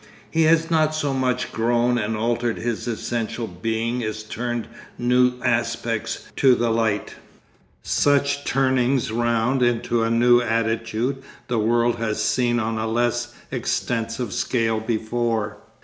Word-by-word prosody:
He 160 0 +3
has 165 +1 +3
not 155 -1 +2
so 145 -3 -1
much 125 -1 -1
grown 120 +1 +1
and 110 0 -2
altered 120 +1 0
his 120 0 -3
essential 115 0 -3
being 115 +5 -2
as 110 0 -4
turned 120 +2 -4 0.3
new 125 +1 +3
aspects 115 -2 -1
to 130 -2 +5
the 120 -1 0
light. 110 -3 0 0.7
Such 140 0 +2
turnings 130 -3 +1
round 120 +2 +1
into 120 -1 +1
a 115 - +1
new 120 +1 +5
attitude 115 +3 -1 0.3
the 120 -2 0
world 120 +2 +2
has 110 -2 -2
seen 120 +2 +1
on 110 0 -2
a 110 - -1
less 120 +1 -1 0.2
extensive 115 -1 -2
scale 115 -3 0
before. 110 -1 -1
120 Hz, 135 wpm, -23 LUFS, 115-125 Hz, 0.7 s, to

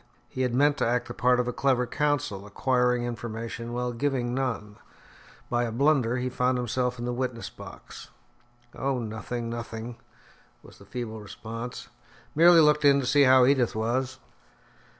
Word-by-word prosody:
He 130 - -5
had 125 -2 0
meant 145 +2 +3
to - - +1
act 120 +1 0
the - - -6
part 125 0 +2
of 125 - 0
a 125 - -2
clever 130 -2 +1
counsel, 145 -8 -1
acquiring 125 +2 +1
information 115 0 -5
while 125 0 -2
giving 125 -1 -1
none; 115 -6 -3 0.7
by 120 0 0
a 115 - -3
blunder, 130 -1 +2
he 125 +1 -2
found 125 0 0
himself 125 +1 -1
in 120 - -5
the 125 - -2
witness 120 -2 -4
box. - - -11 0.6
"Oh, 135 -1 -1
nothing, 115 +1 -4
nothing," 115 0 -6 0.7
was - - -16
the 100 - -15
feeble 110 0 -6
response, 115 +3 -7 0.5
"merely 170 +1 +7
looked 150 0 +4
in 140 -1 +6
to 135 - -2
see 140 +2 +4
how 130 -1 +6
Edith 130 -4 +2
was." 125 +4 -1
125 Hz, 165 wpm, -27 LUFS, 115-130 Hz, 0.7 s, merely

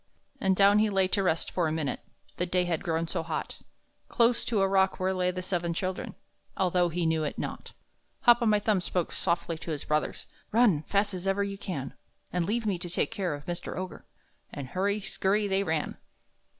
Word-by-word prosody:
And 190 -7 +2
down 200 +2 +6
he 215 0 +3
lay 195 -2 +3
to 200 - +2
rest 170 -4 +1
him - - -18
for 175 -3 +1
a - - -1
minute 155 -3 -1 0.4
The 180 - 0
day 180 0 +2
had 170 -3 -1
grown 165 -2 0
so 170 0 -2
hot 160 -1 -4 0.5
Close 235 0 +3
to 220 -4 +1
a 195 - +4
rock 190 0 +2
where 185 +1 +1
lay 180 -1 +1
the 185 0 -3
seven 175 -2 -1
children, 185 +1 -3 0.4
Although 180 -2 +2
he 170 +1 -1
knew 160 -1 +1
it 150 - -3
not. - - -5 0.5
Hop 240 0 +6
o' 235 - +2
my 210 -1 +5
thumb 205 -2 +1
spoke 180 -1 -1
softly 170 -2 -1
to - - -8
his 150 -3 -3
brothers: 150 0 -1 0.3
"Run! 215 -9 +4
fast 200 0 +1
as 185 +1 -4
ever 195 +1 +2
you 200 -1 -4
can, 145 -11 -4 0.4
And 175 -2 0
leave 225 +2 0
me 195 -4 0
to 175 - -4
take 175 - 0
care 190 -8 -1
of 145 - -11
Mr. 175 -1 -4
Ogre." 185 0 -6 0.4
And 140 -3 -6
hurry 200 +3 0
scurry 200 +1 0
they 195 0 +2
ran. 160 -5 -1
185 Hz, 215 wpm, -29 LUFS, 170-200 Hz, 0.5 s, down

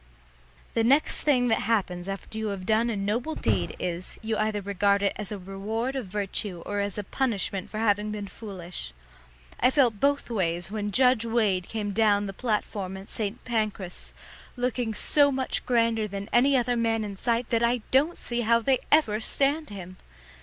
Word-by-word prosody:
The 230 - +2
next 275 +6 +3
thing 255 -5 +3
that 225 - +3
happens 185 -5 0
after 195 +2 -6
you 220 - -2
have 195 -2 -4
done 220 +3 +2
a 230 - -1
noble 225 +10 -1
deed 95 -6 0
is, 180 0 -3
you 220 0 -1
either 215 -1 0
regard 200 0 +1
it 200 - +2
as 210 -2 -4
a 210 - -3
reward 210 +7 -3
of 255 -7 -3
virtue 195 -2 -3
or 205 0 -2
as 200 -1 -2
a 210 - -2
punishment 200 -4 -2
for 215 - -6
having 210 -1 +1
been 210 -1 -4
foolish. 185 - -7 0.7
I 250 - +5
felt 255 -7 +3
both 280 -1 +1
ways 175 -3 0
when 210 -1 -2
Judge 250 0 +4
Wade 215 -6 +1
came 210 -2 -3
down 205 -1 +3
the 195 - -5
platform 205 -4 -2
at 190 +1 -11
St. 215 +1 -2
Pancras, 215 -6 -2 0.5
looking 245 -2 -1
so 285 +4 +4
much 260 -1 -2
grander 230 -3 +2
than 200 0 -6
any 265 +3 +5
other 245 0 +1
man 225 -1 +1
in 205 -2 -5
sight 235 +3 -1
that 230 -1 +2
I 235 -1 +1
don't 295 +6 +3
see 240 0 -2
how 230 0 +4
they 255 +3 +2
ever 225 -9 +4
stand 280 +6 0
him. 185 -2 -9
215 Hz, 185 wpm, -27 LUFS, 200-240 Hz, 0.7 s, I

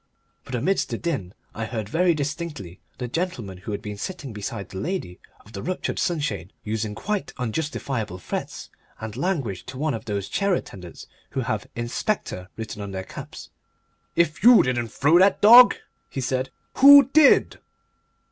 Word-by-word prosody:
But 130 - -5
amidst 185 +11 0
the - - -3
din 140 - -3 0.2
I 110 - -4
heard 110 -2 -4
very 170 - +2
distinctly 145 - -5 0.2
the 125 - -4
gentleman 120 - -4
who 100 - -7
had 100 0 -4
been 105 -2 -6
sitting 150 - -6
beside 105 -1 -6
the 95 - -7
lady 170 - -4 0.3
of 110 - -17
the 100 - -6
ruptured 185 +1 -3
sunshade 110 - -2
using 110 -1 -3
quite 210 - -3
unjustifiable 125 - -3
threats 90 - -6 0.3
and 110 -1 -7
language 135 - -2
to 130 0 -8
one 150 +1 -1
of 115 - -6
those 100 -3 -3
chair 200 -2 +1
attendants 90 - -8 0.2
who 135 - -2
have 110 -4 -3
"Inspector" 120 - -3
written 110 -2 -6
on 100 - -5
their 95 -1 -5
caps. - - -10 0.6
"If 160 -2 +1
you 240 0 +8
didn't 120 -2 -1
throw 150 +9 +3
the 190 +1 +5
dog," 240 +4 +9 0.3
he - - -5
said, 130 +1 -1 0.3
"who 280 -1 +9
DID?" 310 -2 +5
125 Hz, 165 wpm, -24 LUFS, 105-170 Hz, 0.6 s, dog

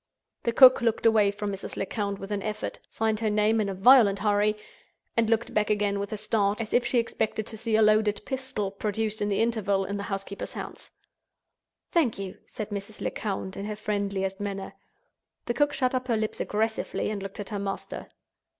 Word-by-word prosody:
The 235 - 0
cook 255 +1 +8
looked 230 -1 0
away 220 -3 +5
from 205 0 -3
Mrs. 195 0 -6
Lecount 200 0 -2
with 195 +1 -8
an 205 -1 -1
effort—signed 215 +1 -3
her 220 -1 +1
name 215 +1 +3
in 200 - -1
a 195 - -3
violent 205 0 +6
hurry—and 210 +2 -1
looked 225 0 +1
back 210 0 +1
again 205 -1 +1
with 200 0 -4
a 215 - -3
start, 210 -1 +1
as 225 -1 -4
if 245 - +4
she 250 - +1
expected 220 -2 -1
to 225 - -3
see 225 0 -1
a 220 - +5
loaded 215 -1 +3
pistol 260 -7 -3
(produced 215 +2 -2
in 205 - +1
the 200 - 0
interval) 200 -4 0
in 200 +1 -3
the - - -4
housekeeper's 195 0 -5
hands. - - -8 1.0
"Thank 305 -10 +2
you," 195 -1 -6
said 215 -1 -6
Mrs. 205 +1 -6
Lecount, 195 -2 -3
in 200 - -5
her 210 0 -3
friendliest 200 -2 -2
manner. 200 -1 -4 0.7
The 240 - -1
cook 290 +3 +2
shut 255 -3 0
up 255 0 -1
her 230 -3 +2
lips 215 0 -2
aggressively 220 0 -1
and 205 -2 -4
looked 195 +1 -7
at 205 - -5
her 205 - -3
master. 195 0 -5
210 Hz, 195 wpm, -27 LUFS, 200-225 Hz, 1.0 s, cook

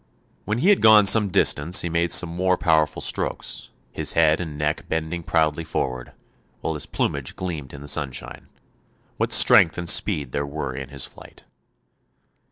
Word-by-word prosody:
When 105 +3 -2
he 170 +11 +1
had 205 - +3
gone 110 -2 +6
some 105 +1 +6
distance 85 0 +2
he - - -4
made 85 0 -1
some 90 - +5
more 90 +2 -1
powerful 80 -2 0
strokes, - - -4 0.2
his - - -2
head 80 0 +2
and 80 -4 -7
neck 75 +1 -3
bending 80 +2 -4
proudly 80 -1 -1
forward, 65 -5 -5 0.5
while 80 - -3
his 75 - -7
plumage 70 -2 -4
gleamed 80 -7 -6
in 70 - -11
the 70 - -11
sunshine. 65 -3 -3 0.7
What - - -2
strength 80 - +6
and 90 -1 -6
speed 75 -9 +1
there 70 +1 -3
were 70 -2 -6
in 70 0 -8
his 70 -3 -2
flight. - - -16
80 Hz, 170 wpm, -22 LUFS, 70-90 Hz, 0.7 s, gone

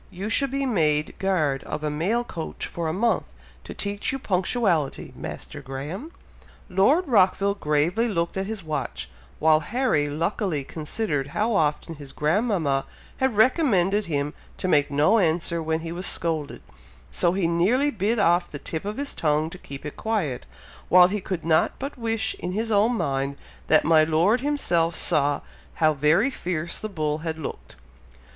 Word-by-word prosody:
you 195 +5 -5
should 275 +3 +3
be 275 +1 -1
made 155 - +1
guard 155 -8 0
of 155 - -5
a 150 - 0
mail 195 +11 0
coach 170 -9 -6
for 170 -1 -4
a - - 0
month, 225 +7 0 0.3
to - - -9
teach 200 0 -3
you 270 - -2
punctuality, 185 - 0
Master 145 - -7
Graham." 145 - -6 0.6
Lord 265 - +3
Rockville 200 -3 +3
gravely 170 +6 +1
looked 170 -6 -1
at 190 0 -2
his 215 -3 -5
watch, 150 - -4 0.3
while 155 0 +4
Harry 160 - 0
luckily 165 0 -1
considered 150 -1 -3
how 220 +2 +1
often 155 -2 0
his 145 -3 -10
grandmama 160 - +1 0.3
had 265 -5 0
recommended 210 - +3
him 145 -1 -1 0.2
to - - -2
make 145 -4 +3
no 150 +11 +3
answer 170 -1 +1
when 160 0 -1
he 165 0 -5
was 180 +2 -2
scolded, 160 -4 -1 0.5
so 175 0 +1
he 190 -2 0
nearly 205 +13 +2
bit 220 +1 0
off 175 -3 +3
the 145 - -6
tip 160 +4 -5
of 210 +1 -4
his 285 0 -3
tongue 155 +1 0
to 180 - -8
keep 140 +1 -9
it 150 - -6
quiet, 190 - -2 0.4
while 180 0 +7
he 205 +1 -2
could 180 -3 -4
not 160 -1 +3
but 280 +2 -5
wish, 225 -3 -1
in 180 +1 -4
his 225 +3 -1
own 220 +4 +3
mind, 140 -2 -1 0.3
that 155 - +4
my 160 0 +6
Lord 170 +10 +2
himself 175 - +1
saw 145 0 +1 0.3
how 155 -1 +3
very 155 - +3
fierce 170 -7 -3
the 215 - -5
bull 155 -5 -2
had 160 0 -4
looked. 160 - -7
175 Hz, 170 wpm, -25 LUFS, 155-215 Hz, 0.6 s, while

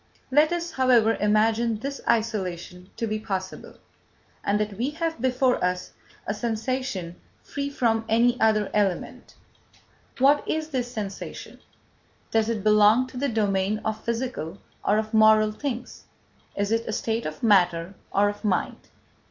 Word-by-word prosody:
Let 300 +4 +4
us, 345 0 -2
however, 245 -5 +4
imagine 220 +2 +2
this 275 +5 -5
isolation 185 -5 -2
to 230 - -1
be 215 -1 -2
possible, 190 -3 -5 0.7
and 205 +1 +1
that 210 -1 -2
we 250 +4 0
have 325 -3 -3
before 255 -2 +1
us 180 0 -1 0.3
a 205 - -1
sensation 225 -5 -3 0.3
free 280 0 -4
from 225 -5 0
any 240 +2 +3
other 215 -2 +2
element. 200 -4 -2 0.8
What 280 +3 +4
is 315 0 -1
this 250 -4 -2
sensation? 205 -4 -7 0.7
Does 225 0 +2
it 220 -4 -2
belong 215 +3 +5
to 255 - -10
the 280 +2 0
domain 205 -2 0
of 220 0 -3
physical 235 -8 -3 0.3
or 210 - +2
of 215 +1 -2
moral 215 0 +5
things? 245 +1 -6 0.5
Is 200 +1 -1
it 230 0 0
a 220 - -2
state 225 -1 -2
of 155 +5 -8
matter 180 -4 +3 0.2
or 205 +1 +3
of 205 +1 -5
mind? 205 -4 -1
220 Hz, 145 wpm, -25 LUFS, 205-250 Hz, 0.8 s, belong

